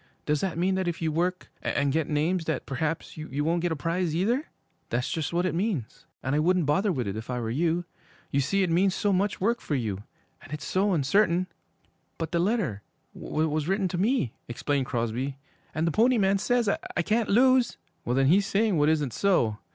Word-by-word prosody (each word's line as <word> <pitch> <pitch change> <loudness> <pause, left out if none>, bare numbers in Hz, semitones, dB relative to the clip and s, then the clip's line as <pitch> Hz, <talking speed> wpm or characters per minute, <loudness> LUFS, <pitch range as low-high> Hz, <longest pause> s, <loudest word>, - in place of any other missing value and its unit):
'Does 150 -1 +1
that 190 -4 -2
mean 185 +3 +2
that 190 -1 -1
if 170 -1 -2
you 160 -1 0
work 180 +3 -1
and 140 -1 0
get 160 -1 0
names 160 +3 0
that 160 - -2
perhaps 155 +5 -3
you 145 -2 -3
won't 165 +2 +1
get 175 0 0
a - - 0
prize 165 +2 -1
either?' 235 - +1 0.4
'That's 125 +3 -1
just 160 -3 -2
what 175 +1 +1
it 185 - 0
means, 170 - -3 0.2
and 130 - -1
I 150 - +2
wouldn't 175 +1 +2
bother 190 +8 +2
with 125 - -2
it 100 - -3
if 110 +3 -7
I 125 -1 -2
were 115 -1 -3
you. 170 +6 0 0.5
You 140 - +2
see 195 +9 +1
it 180 - 0
means 190 +3 +3
so 205 0 +1
much 195 +2 0
work 235 +5 +1
for 150 - -2
you 105 -6 -2 0.4
and 145 - -14
it's 150 -1 -5
so 195 +1 +1
uncertain.' 175 +4 +2 0.7
'But 165 -1 -4
the 170 - +1
letter 180 - 0 0.3
was 155 -1 -1
written 195 +1 +1
to 175 - -3
me,' 205 - +1
explained 135 +2 -1
Crosby. 120 +3 -2 0.4
'And 160 +1 +1
the 165 - +1
Pony 240 +7 +4
Man 195 -1 +3
says 245 +2 +1
I 195 - -1
can't 220 +4 +1
lose!' 255 +3 +4 0.3
'Well, 120 - -1
then 135 0 +3
he's 195 +8 +4
saying 205 -4 +2
what 145 +1 +4
isn't 150 -6 +1
so. 120 - +2
165 Hz, 215 wpm, -27 LUFS, 145-195 Hz, 0.7 s, Pony